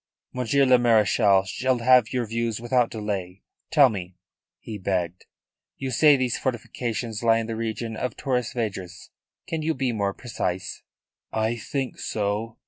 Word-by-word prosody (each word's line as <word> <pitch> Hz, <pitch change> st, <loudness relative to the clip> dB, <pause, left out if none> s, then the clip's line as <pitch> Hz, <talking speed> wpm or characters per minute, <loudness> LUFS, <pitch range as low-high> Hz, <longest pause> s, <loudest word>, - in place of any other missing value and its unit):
"Monsieur 125 Hz, +2 st, +2 dB
le 130 Hz, -1 st, +5 dB
Marechal 105 Hz, -4 st, +4 dB
shall 130 Hz, +6 st, 0 dB
have 125 Hz, -1 st, +4 dB
your 125 Hz, -2 st, 0 dB
views 115 Hz, 0 st, -2 dB
without 120 Hz, 0 st, +1 dB
delay. 100 Hz, -4 st, -4 dB, 0.3 s
Tell 145 Hz, -4 st, +6 dB
me," 95 Hz, -6 st, -5 dB, 0.4 s
he 110 Hz, -2 st, -7 dB
begged. 90 Hz, -2 st, -2 dB, 0.5 s
"You 135 Hz, -1 st, -4 dB
say 145 Hz, +3 st, +6 dB
these 125 Hz, -2 st, -1 dB
fortifications 120 Hz, -2 st, -3 dB
lie 115 Hz, -1 st, +4 dB
in 115 Hz, -, -1 dB
the 115 Hz, 0 st, -4 dB
region 115 Hz, 0 st, -3 dB
of 125 Hz, +3 st, -4 dB
Torres 125 Hz, -4 st, -1 dB
Vedras. 95 Hz, -7 st, -5 dB, 0.3 s
Can 160 Hz, -1 st, -3 dB
you 160 Hz, +1 st, 0 dB
be 130 Hz, -3 st, 0 dB
more 100 Hz, -3 st, -1 dB
precise?" 95 Hz, -6 st, -4 dB, 0.5 s
"I 110 Hz, +1 st, 0 dB
think 130 Hz, +3 st, -4 dB
so. 105 Hz, +2 st, -2 dB
115 Hz, 150 wpm, -25 LUFS, 105-125 Hz, 0.5 s, Tell